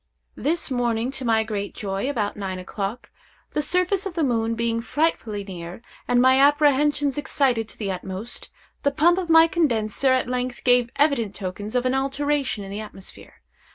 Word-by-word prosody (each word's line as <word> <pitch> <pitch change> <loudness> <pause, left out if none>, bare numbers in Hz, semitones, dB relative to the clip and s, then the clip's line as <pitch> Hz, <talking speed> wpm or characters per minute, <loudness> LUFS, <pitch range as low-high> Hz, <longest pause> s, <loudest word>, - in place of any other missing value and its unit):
This 320 0 -1
morning, 240 -1 0
to 270 -1 -5
my 225 -1 +3
great 205 -2 -4
joy, 195 +4 -3
about 215 -7 -2
nine 190 -2 -4
o'clock, 195 +5 -5 0.4
the 300 - 0
surface 365 +5 +1
of 360 - -8
the 330 - 0
moon 230 -3 0
being 230 0 -1
frightfully 230 -6 -1
near, 180 +2 -8 0.2
and 245 - +3
my 260 +1 +5
apprehensions 290 0 +3
excited 255 -6 0
to - - -10
the 200 -3 -3
utmost, 190 +4 -7 0.3
the 285 - +2
pump 340 +6 +3
of 355 -3 -4
my 325 0 +8
condenser 260 -6 +1
at 260 -1 +2
length 250 0 -3
gave 245 -1 +4
evident 275 -9 +1
tokens 205 +3 -5
of 250 0 +1
an 255 - +2
alteration 275 -3 -1
in 195 - -8
the 205 - -4
atmosphere. 210 -3 -12
245 Hz, 175 wpm, -23 LUFS, 210-285 Hz, 0.4 s, my